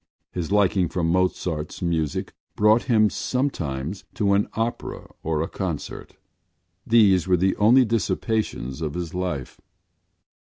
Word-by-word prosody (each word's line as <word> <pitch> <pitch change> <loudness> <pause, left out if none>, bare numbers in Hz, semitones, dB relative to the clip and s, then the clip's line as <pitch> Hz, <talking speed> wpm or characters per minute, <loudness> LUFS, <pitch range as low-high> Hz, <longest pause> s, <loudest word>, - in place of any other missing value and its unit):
His 90 0 -4
liking 95 -4 +3
for 90 - -2
Mozart’s 85 -2 -1
music 80 -4 -1 0.2
brought 110 +2 +4
him 110 -3 +5
sometimes 90 - -2
to 100 -1 +2
an 100 +1 +2
opera 115 +1 -4
or 80 -1 -1
a - - -3
concert: 90 -6 -5 0.7
these 100 -7 +5
were 90 -1 +4
the 95 +2 +2
only 120 +5 +6
dissipations 105 - -1
of 75 -1 -3
his 85 -2 -4
life. 90 -8 -4
95 Hz, 125 wpm, -24 LUFS, 80-105 Hz, 0.7 s, only